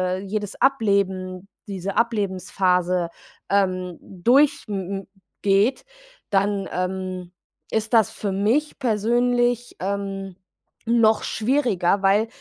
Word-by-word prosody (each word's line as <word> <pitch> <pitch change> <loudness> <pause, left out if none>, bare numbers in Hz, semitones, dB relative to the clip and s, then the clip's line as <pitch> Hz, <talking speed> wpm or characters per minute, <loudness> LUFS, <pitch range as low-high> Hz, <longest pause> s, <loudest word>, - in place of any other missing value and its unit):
äh - - -4
jedes 205 +1 -4
Ableben, 195 -7 +1 0.2
diese 195 -1 -4
Ablebensphase, 185 -5 +1 0.4
ähm, 185 -3 0
durch 245 +11 +2
m 205 - -2 0.3
m - - -20 0.4
geht, 205 +6 +2 0.4
dann, 200 0 +1
ähm, 185 -1 -3 0.4
ist 220 +1 -1
das 225 -3 +5
für 205 - -3
mich 225 +11 0
persönlich, 240 +1 +1
ähm, 195 -1 -4 0.5
noch 225 -2 +4
schwieriger, 215 -6 +1
weil 200 +3 +3
200 Hz, 100 wpm, -23 LUFS, 185-230 Hz, 0.5 s, das